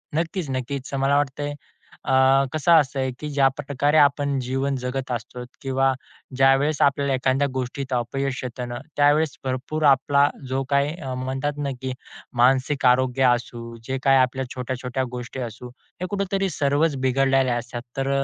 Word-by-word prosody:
नक्कीच-नक्कीच. 140 -6 -3
मला 135 +1 +2
वाटतंय, 145 +1 -2 0.5
अ, 135 - 0 0.4
कसं 155 +2 +1
असतंय 135 -4 +3
की 150 - -5
ज्या 140 -2 +3
प - - -3
प्रकारे 145 +2 +1
आपण 140 -1 +3
जीवन 135 +2 -1
जगत 130 0 -3
असतो 120 +1 -5 0.2
किंवा 135 0 +1 0.4
ज्यावेळेस 135 +3 +3
आपल्याला 140 0 +2
एखाद्या 130 +2 +1
गोष्टीत 130 +1 -4
अपयश 130 +2 -2
येतं 125 0 -5
ना, 120 - -4 0.2
त्यावेळेस 145 +1 +3
भरपूर 135 +4 -3
आपला 140 +2 +3 0.2
जो 135 +1 -1
काही 140 +1 +2
अ, 130 -4 -5
म्हणतात 135 +3 -2
ना, 145 -1 -2
की 130 -1 -3 0.5
मानसिक 130 +2 +3
आरोग्य 130 +1 +3
असू, 120 -1 -6
जे 135 0 -1
काही 135 0 +5
आपल्या 130 +1 +1
छोट्या-छोट्या 130 +1 -3
गोष्टी 125 +1 -6
असू, 125 +3 -11 0.3
हे - - -1
कुठेतरी 195 -1 -1
सर्वच 145 +1 +1
बिघडलेले 135 0 +2
असतात. 120 0 -3 0.2
तर 135 0 -1
135 Hz, 150 wpm, -23 LUFS, 130-145 Hz, 0.5 s, काही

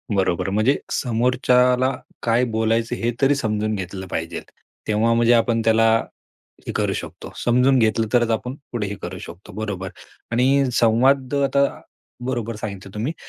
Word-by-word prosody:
बरोबर. 95 -1 0
म्हणजे 110 +8 +2
समोरच्याला 125 +1 +2 0.3
काय 115 +2 +2
बोलायचं 115 +1 0
हे 120 +1 -1
तरी 135 +1 +4
समजून 110 -4 -1
घेतलं 95 0 -6
पाहिजेल. 80 -1 -4 0.4
तेव्हा 110 +2 +2
म्हणजे 120 +1 +4
आपण 115 -1 +2
त्याला 115 0 +4 0.8
हे - - -2
करू - - 0
शकतो - - -7
समजून 125 +2 +4
घेतलं 110 0 +2
तरच 120 -2 +3
आपण 125 +4 -2 0.2
पुढे 110 -4 -2
हे 100 - -4
करू - - -6
शकतो. 95 +4 -11
बरोबर 100 -3 -4 0.4
.आणि 130 +4 +3
संवाद 130 +4 +3
अ, 140 - +1
आता 140 0 +3 0.6
बरोबर 120 -3 -2
सांगितलं 100 -2 -7
तुम्ही 115 +9 -2
115 Hz, 150 wpm, -22 LUFS, 105-125 Hz, 0.8 s, तरी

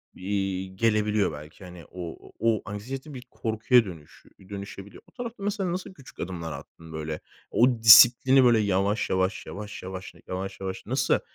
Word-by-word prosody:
eee, 95 0 -2
gelebiliyor 105 +1 +1
belki. 75 +4 -11
Hani 90 -2 -11
o 85 -3 -7
o - - -21
o 115 -2 +2
anksiyete 130 +8 -7
bir 130 - -7
korkuya 115 +1 +2
dönüş 80 -6 -12 0.2
dönüşebiliyor. 100 0 -9
O - - -22
tarafta 235 -4 -7
mesela 200 -3 -1
nasıl 185 +1 -5
küçük 140 -8 -16
adımlar 85 -2 -5
attın 80 +1 -11
böyle? 80 0 -4 0.3
O 125 - +4
disiplini 120 +4 +8
böyle 120 -2 +5
yavaş 100 +1 0
yavaş, 95 +1 0
yavaş 105 +1 -8
yavaş, 95 0 -7
yavaş 95 +1 -5
yavaş 95 -1 -5
nasıl 130 +3 +1
100 Hz, 160 wpm, -26 LUFS, 95-120 Hz, 0.3 s, disiplini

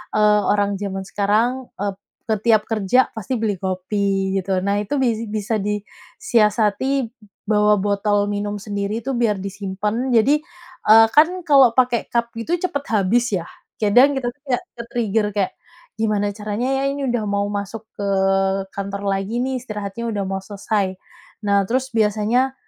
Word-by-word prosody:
eee, 210 0 +4
orang 205 -1 +1
jaman 195 -1 -3
sekarang 225 +6 0
ep 200 -1 -3 0.3
ke 220 - +3
tiap 220 -2 +5
kerja 225 +3 +2
pasti 220 +4 -3
beli 220 -4 -1
kopi 195 +1 -1
gitu. 185 0 -1
Nah 200 +1 +1
itu 210 +7 -3 0.3
bisa 215 +1 -1
di 210 +1 -2 0.4
siasati 230 - +2 0.5
bawa 210 0 +4
botol 205 0 +1
minum 205 0 -2
sendiri 205 +1 -3
itu 270 - -2
biar 230 -3 +2
disimpan. 205 +5 -3
Jadi, 275 +7 +4 0.5
eee, 225 +1 +8
kan 300 +2 +8 0.2
kalau 270 -5 +6
pakai 245 -2 +2
cup 235 0 0
gitu 325 +10 0
cepet 285 -6 -2
habis 215 +4 +3
ya. 175 - -2 0.4
Kadang 245 +7 +5
kita 255 -2 -1
tuh 280 - -35
kayak 250 -2 0 0.2
ke-trigger 225 -3 -1
kayak, 200 -2 0 0.5
gimana 210 -2 +1
caranya 210 +3 -3
ya, - - -1
ini 280 -2 -2
udah 240 -2 -1
mau 200 0 0
masuk 205 +2 -4 0.2
ke 200 - -2 0.7
kantor 200 0 -4
lagi 195 +4 -2
nih, 260 0 -1
istirahatnya 215 -1 -5
udah 205 -2 -2
mau 195 0 -2
selesai. 200 -1 -2 0.5
Nah, 200 -1 +3
terus 260 +3 -1
biasanya 220 +4 +1
210 Hz, 155 wpm, -21 LUFS, 200-235 Hz, 0.7 s, eee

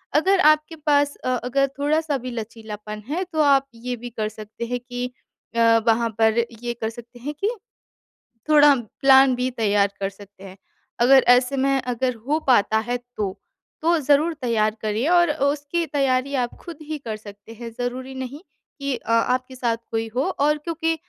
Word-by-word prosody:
अगर 375 +6 +4
आपके 305 -1 +3
पास 290 -2 +1
अ, - - -4 0.2
अगर 275 +2 +2
थोड़ा-सा 300 0 +1
भी 255 +1 -6
लचीलापन 215 -2 -7
है 350 +5 -1
तो 315 - +2
आप 275 -2 +4
ये 245 +2 -4
भी 240 +1 -8
कर 215 -2 -3
सकते 215 +2 -8
हैं 245 +1 -2
कि 245 0 -5 0.5
अ, 235 - 0 0.3
वहाँ 230 +1 +3
पर 220 +1 +4 0.2
ये 240 0 -2
कर 220 - 0
सकते 240 +1 -12
हैं 290 +5 -5
कि 410 - +1 1.0
थोड़ा 295 -1 +7 0.3
प्लान 270 -1 +6
बी 250 +1 -1
तैयार 205 -4 +2
कर 195 0 -1
सकते 200 0 -15
हैं। 190 -1 -11 0.4
अगर 260 +2 +6
ऐसे 250 +2 +4
में 275 0 +2
अगर 250 +1 -1
हो 305 +2 +2
पाता 220 -3 +4
है 245 0 0
तो, 215 -6 -5 0.4
तो 335 +1 +3
ज़रूर 295 +4 +3
तैयार 220 -3 +1
करिए 220 +7 -1
और 345 -1 +5
अ, 295 -2 -1
उसकी 290 +4 0
तैयारी 275 -1 0
आप - - -17
खुद 340 -3 -9
ही 310 0 -5
कर 225 -5 -5
सकते 205 +1 -13
हैं 230 +1 -8
ज़रूरी 255 +2 -4
नहीं 260 +3 -6 0.4
कि 280 -1 -1
अ, - - -9
आपके 255 +3 +1
साथ 235 -2 0 0.2
कोई 225 0 -1
हो 260 - +2 0.2
और 300 +1 +3
क्योंकि 325 +1 -1
255 Hz, 180 wpm, -23 LUFS, 230-290 Hz, 1.0 s, थोड़ा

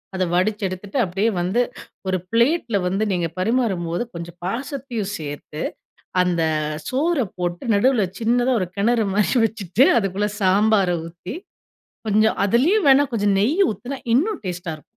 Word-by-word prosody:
அதை 185 -1 +1
வடிச்சு 205 +4 +1
எடுத்துட்டு 190 +6 -6
அப்டியே 195 +3 0
வந்து 185 +8 +1 0.5
ஒரு 185 0 +1
பிளேட்டில 235 -1 +2
வந்து 195 +4 0
நீங்க 175 -2 0
பரிமாறும்போது, 190 -5 0
கொஞ்சம் 170 0 -8
பாசத்தையும் 240 -1 -4
சேர்த்து 150 0 -7 0.6
அந்த 175 -2 +1 0.5
சோறு 285 0 +1
போட்டு 175 +2 -3
நடுவில 220 -1 +3
சின்னதா 245 +3 +2
ஒரு 185 - -2
கிணறு 225 +3 +2
மாதிரி 210 +5 +2
வச்சுட்டு, 215 - +2
அதுக்குள்ளே 200 0 -1
சாம்பாரை 195 -1 +3
ஊத்தி 175 +5 -8 0.7
கொஞ்சம் 215 +1 +3
அதுலயும் 295 - +3
வேண்ணா 275 +1 +7
கொஞ்சம் 205 -3 +2
நெய் 305 - +3
ஊத்தினா 260 +5 -6 0.2
இன்னும் 365 - +2
டேஸ்ட்டா 180 -1 -5
இருக்கும். 155 - -17
210 Hz, 135 wpm, -22 LUFS, 180-245 Hz, 0.7 s, வேண்ணா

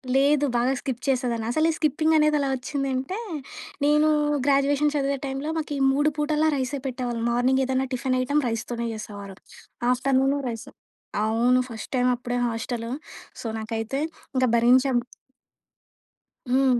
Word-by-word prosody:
లేదు. 285 +1 +4
బాగా 245 +2 +2
స్కిప్ 255 -3 -4
చేసేదాన్ని. 245 -4 0
అసలు 310 +5 +2
ఈ - - -3
స్కిప్పింగ్ 310 +1 +2
అనేది 300 0 +4
ఎలా 275 -1 0
వచ్చిందంటే, 270 - -3 0.7
నేను 300 +1 +4 0.4
గ్రాడ్యుయేషన్ 285 +1 +3
చదివే 280 -1 0
టై‌మ్‌లో 275 +3 -3
మాకు 305 -2 -3
ఈ - - -3
3 290 +3 +3
పూటలా 305 +1 +2
రైసే 270 +1 -2
పెట్టేవాళ్ళు. 245 -2 -3
మార్నింగ్ 255 +2 +2
ఏదన్నా 260 0 0
టిఫిన్ 255 +1 0
ఐటెమ్ 285 +3 +1
రైస్‌తోనే 235 +1 -3
చేసేవారు. 205 -3 -8 0.6
Afternoon 270 +2 +2
rice. 225 -1 -6 0.6
అవును. 240 +3 +3
ఫస్ట్ 225 -2 -8
టైమ్ 250 0 +2
అప్పుడే 245 0 -3
హాస్టలు. 230 0 -3 0.5
సో, - - -5
నాకైతే 225 +4 -3 0.4
ఇంకా 255 0 +3
భరించాం. 255 +2 +4 1.6
హ్మ్. 260 -1 +4
260 Hz, 135 wpm, -25 LUFS, 240-285 Hz, 1.6 s, లేదు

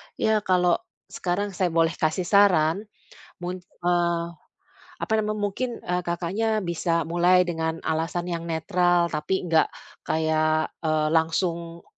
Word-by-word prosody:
Ya, 220 -1 +2
kalau 180 -3 +2 0.3
sekarang 200 +3 -2
saya 185 -1 0
boleh 165 -1 +2
kasih 155 +3 +1
saran, 195 0 +3 0.5
mun 180 +1 -4
eee, 175 -1 0 0.8
apa - - -4
namanya, 215 0 -2
mungkin, 245 +6 -2 0.2
eee, 180 0 0
Kakaknya 190 +5 -1
bisa 170 -1 0
mulai 175 +2 +4
dengan 160 -1 -2
alasan 165 +2 -1
yang 170 -2 -3
netral 175 +1 +2
tapi 155 +5 -1
nggak 165 -2 +3 0.4
kayak, 155 0 +1
eee, 155 -1 +1
langsung, 170 +1 0
175 Hz, 125 wpm, -25 LUFS, 160-185 Hz, 0.8 s, mulai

